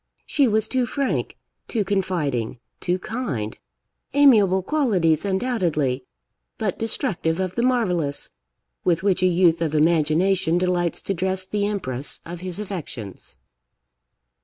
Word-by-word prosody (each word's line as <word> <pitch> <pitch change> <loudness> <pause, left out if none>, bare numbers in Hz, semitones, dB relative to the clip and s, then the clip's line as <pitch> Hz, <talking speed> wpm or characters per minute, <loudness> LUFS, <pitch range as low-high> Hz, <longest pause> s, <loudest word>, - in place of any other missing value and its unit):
She 280 -3 +3
was 220 -1 +1
too 255 0 0
frank, 275 +2 -2 0.3
too 215 -4 -1
confiding, 170 - -1 0.2
too 180 +1 0
kind; 180 - -4 0.6
amiable 210 -10 +5
qualities, 190 - +2
undoubtedly, 175 - 0 0.5
but - - -2
destructive 215 - 0
of 185 -1 -1
the 235 - -1
marvellous, 180 - 0 0.5
with 170 0 +1
which 195 -2 +2
a 185 - +5
youth 175 -2 +3
of 155 -2 0
imagination 165 +3 +3
delights 175 -1 0
to 195 - -1
dress 190 +1 0
the 205 +1 -1
empress 145 -10 -3
of 170 +1 -7
his 185 -1 -2
affections. 165 - -7
185 Hz, 125 wpm, -23 LUFS, 160-210 Hz, 0.6 s, amiable